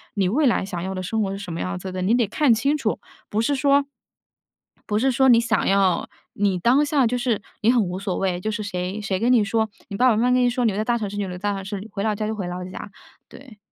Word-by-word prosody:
你 195 -3 +1
未 290 +9 +2
来 230 - +2
想 180 -3 -5
要 190 +1 -3
的 185 - -3
生 220 +5 -2
活 195 - -2
是 195 - -4
什 200 -3 -7
么 165 - -5
样 90 0 -3
子 185 - -6
的， 185 0 -4
你 200 +5 +2
得 240 -3 +2
看 270 +4 +3
清 275 +7 +1
楚。 225 -7 -2 0.3
不 215 - 0
是 285 +5 +1
说， 280 0 +3 1.0
不 210 -1 0
是 265 +2 +2
说 265 +2 +3
你 235 -2 +7
想 230 -3 0
要， 195 -2 +2 0.3
你 195 -3 0
当 260 +9 +3
下 285 -4 +2
就 250 +2 -1
是 240 -4 -1 0.2
你 225 - +4
很 245 -3 +3
无 180 0 -4
所 195 -2 -3
谓， 185 -2 -1
就 215 - -2
是 215 0 -3
谁， 185 +1 -4
谁 195 -2 -2
跟 240 +3 +3
你 230 -4 +4
说， 220 +2 0 0.2
你 200 - -5
爸 255 0 +5
爸 225 - +3
妈 215 - +1
妈 250 - +3
跟 250 0 +3
你 245 - +4
说： 250 +1 -2
“你 225 - +3
留 195 - -4
在 215 - -1
大 240 - +1
城 210 -3 -3
市 205 - -7
就 205 - -1
留 180 - -6
在 - - -11
大 - - 0
城 195 -1 -6
市， 205 +1 -6
回 200 - -4
老 215 -1 +1
家 215 +1 -3
就 220 - -2
回 190 -4 -4
老 180 +1 -5
家。” 185 +2 -8 0.4
对。 255 -6 -14
215 Hz, 320 characters per minute, -23 LUFS, 195-240 Hz, 1.0 s, 你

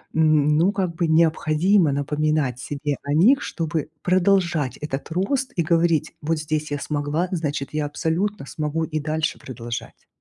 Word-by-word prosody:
м, 155 -2 +4
ну 180 +5 +4
как 190 -4 -2
бы 170 0 0
необходимо 160 +2 +3
напоминать 145 -2 0
себе 145 +1 -3
о 145 - -2
них, 225 - +5
чтобы 160 -3 -3
продолжать 180 -6 +2
этот 145 -1 -5
рост 255 - -1
и 170 - +1
говорить: 165 -1 +2
"Вот 160 +2 0
здесь 155 0 -2
я 145 - 0
смогла, 150 +4 -1
значит 145 -5 -2
я 150 -1 0
абсолютно 170 +4 -2
смогу 155 +3 -2
и 155 -1 -3
дальше 155 +1 -2
продолжать". 120 -2 -7
155 Hz, 155 wpm, -23 LUFS, 145-170 Hz, -, них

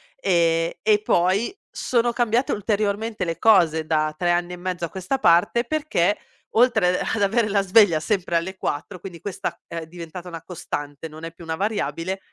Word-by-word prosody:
ehm, 165 -3 +2
e 210 -1 +4
poi 190 - +1
sono 240 -1 0
cambiate 240 +1 +1
ulteriormente 210 0 -1
le 165 -2 -2
cose 170 -8 +4
da 155 -1 0
3 175 -1 +1
anni 175 +1 0
e - - -4
mezzo 180 -1 -4
a 170 - -1
questa 190 +8 -3
parte, 175 +4 +4
perché 245 - 0 0.4
oltre, 220 -7 +4
a - - -2
ad 225 - -1
avere 215 +2 +2
la 200 0 +2
sveglia 195 -4 +5
sempre 175 0 -1
alle 190 +3 -1
4, 180 +5 -4
quindi 175 -1 -9
questa 200 - -4
è 170 - -7
è - - -8
diventata 170 +1 -9
una 165 -2 -7
costante, 145 -3 -6
non 155 +1 -12
è 165 - -5
più 170 - -14
una 160 0 -3
variabile, 190 -2 -2
180 Hz, 185 wpm, -23 LUFS, 165-210 Hz, 0.4 s, sveglia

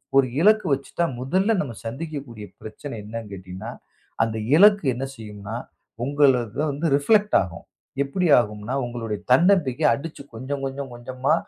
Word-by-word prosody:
ஒரு 135 -1 +5
இலக்கு 215 +1 +5
வச்சுட்டா 140 +5 -1
முதல்ல 185 - +1
நாம 120 -9 -5
சந்திக்கக்கூடிய 135 -4 -6 0.2
பிரச்சனை 115 +5 -8
என்னான்னு 110 -1 -7
கேட்டீங்கன்னா, 95 -1 -7 0.5
அந்த 110 -1 -2 0.2
இலக்கு 205 +1 +6
என்ன 130 +3 -3
செய்யும்னா 105 -1 -8 0.5
உங்களது 135 -5 +3
தா 150 - +1
வந்து 145 +4 -2
ரிஃப்ளக்ட் 210 +9 +3
ஆகும். 85 -4 -7 0.4
எப்படி 175 +6 -1
ஆகும்னா? 105 +1 -3
உங்களுடைய 115 -3 -4
தன்னம்பிக்கை 165 -3 +4
அடிச்சு 150 +4 -6
கொஞ்சம் 135 +4 -4
கொஞ்சம் 135 -1 -5
கொஞ்சமா, 125 +2 -1
130 Hz, 135 wpm, -24 LUFS, 115-150 Hz, 0.5 s, இலக்கு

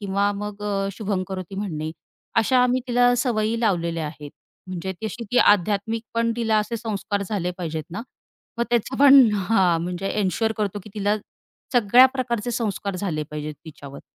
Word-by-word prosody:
किंवा 200 0 0
मग 205 0 -6
अ, 195 -1 -1
शुभंकरोती 190 -3 -4
म्हणणे. 160 -6 -3 0.5
अशा 255 +3 +4
आम्ही 250 +1 +2
तिला 245 0 +4
सवयी 230 -2 0
लावलेल्या 170 -7 0
आहेत. 150 -1 -9 0.4
म्हणजे 185 +1 -4
तशी 230 +2 -4
ती 245 - +3
आध्यात्मिक 210 +3 +3
पण 230 0 +1
तिला 225 -2 +1
असे 215 +2 -2
संस्कार 205 -2 -3
झाले 185 -4 -1
पाहिजेत 160 -3 -4
ना. 200 +6 -5 0.6
मग 235 - +2
त्याचं 240 +2 0
पण 275 -3 +8
हां 185 -4 +2
म्हणजे 180 +2 -3
एन्शुअर 220 +3 0
करतो, 205 -1 -2
की 210 - -12
तिला 205 0 +1 0.6
सगळ्या 245 +2 +7
प्रकारचे 240 -3 -2
संस्कार 205 -4 -2
झाले 170 -6 -2
पाहिजेत 150 0 -5
तिच्यावर. 140 -3 -10
205 Hz, 155 wpm, -23 LUFS, 185-230 Hz, 0.6 s, पण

